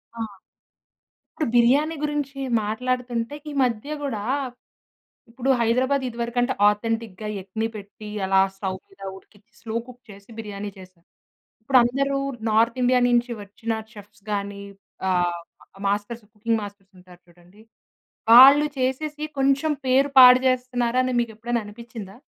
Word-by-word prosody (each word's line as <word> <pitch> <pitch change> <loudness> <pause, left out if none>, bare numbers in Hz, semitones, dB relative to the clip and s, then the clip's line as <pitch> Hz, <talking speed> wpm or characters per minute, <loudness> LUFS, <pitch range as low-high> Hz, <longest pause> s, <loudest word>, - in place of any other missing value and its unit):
ఆ! - - -10 1.1
ఇప్పుడు 310 - -2
బిర్యానీ 280 +7 +3
గురించి 290 -2 -3 0.3
మాట్లాడుతుంటే 245 +2 -2 0.2
ఈ - - -6
మధ్య 245 +4 -2
కూడా 235 -8 -3 1.1
ఇప్పుడు 245 +3 -3
హైదరాబాద్ 255 +4 +1
ఇదివరకు 235 0 -5
అంటే 255 +2 +1
ఆథెంటిక్‌గా, 215 -1 -2
ఎగ్‌ని 220 +4 -3
పెట్టి 210 +1 -10 0.2
అలా 190 0 +3 0.2
స్టోవ్ 190 -1 -4
మీద 195 0 -22
ఉడికిచ్చి, 205 +3 -19
స్లో 225 -1 -6
కుక్ 250 0 -14
చేసి 200 +1 -14
బిర్యానీ 205 -2 -6
చేసారు. 185 -2 -16 0.6
ఇప్పుడు 255 +3 +4
అందరూ 275 +3 0 0.3
నార్త్ 230 +3 +2
ఇండియా 250 0 +4
నించి 240 0 +2
వచ్చిన 220 +3 -5 0.2
చెఫ్స్‌గాని 205 -1 -6 0.5
ఆహ్, 175 -1 0 0.5
మాస్టర్స్ 210 +3 -2
కుకింగ్ 225 +1 -1
మాస్టర్స్ 200 -1 -11
ఉంటారు 180 -1 -17
చూడండి. 175 +4 -21 0.7
వాళ్ళు 275 +5 +9
చేసేసి 295 +4 -2
కొంచెం 275 +3 +2
పేరు 265 +2 +3
పాడు 250 0 +10
చేస్తున్నారని 255 0 0
మీకు 235 -2 -1
ఎప్పుడైనా 235 +1 -2
అనిపించిందా? 215 -2 -10
230 Hz, 125 wpm, -23 LUFS, 205-255 Hz, 1.1 s, పాడు